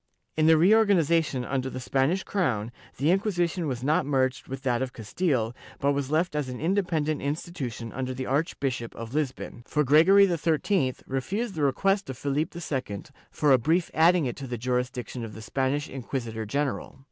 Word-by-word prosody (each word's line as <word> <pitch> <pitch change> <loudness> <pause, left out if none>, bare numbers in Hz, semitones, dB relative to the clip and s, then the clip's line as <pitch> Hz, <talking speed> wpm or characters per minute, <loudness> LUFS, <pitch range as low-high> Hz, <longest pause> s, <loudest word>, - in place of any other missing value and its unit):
In 155 0 +3
the 160 0 +7
reorganization 170 - +3
under 130 0 -2
the 130 - -6
Spanish 135 +8 +1
crown, 120 - -1 0.3
the 145 +5 +2
Inquisition 180 -3 0
was 125 -3 -3
not 150 +3 +2
merged 130 -2 0
with 135 0 -6
that 125 -2 +1
of 130 -1 -3
Castile, 120 - -1 0.2
but 140 - +1
was 140 -1 -2
left 160 +2 +1
as 145 -3 -1
an 125 - -6
independent 165 -4 0
institution 140 -6 -4
under 130 0 -3
the 130 0 -4
Archbishop 135 -4 -2
of 115 +1 -7
Lisbon, 140 -5 -3
for 150 - +1
Gregory 165 +9 +6
XIII 165 -4 +1
refused 195 - -2
the 160 - -4
request 195 +7 +1
of 130 - -5
Philip 145 +3 -1
II 130 - -4 0.3
for 150 -2 +1
a 130 - +6
brief 165 +7 +1
adding 165 0 +4
it 120 - -2
to 140 -2 -6
the 120 -1 -4
jurisdiction 125 0 -2
of 110 -2 -7
the 110 - -8
Spanish 135 +6 -1
inquisitor 115 -4 -5
general.' 140 +3 -2
140 Hz, 175 wpm, -27 LUFS, 125-165 Hz, 0.3 s, the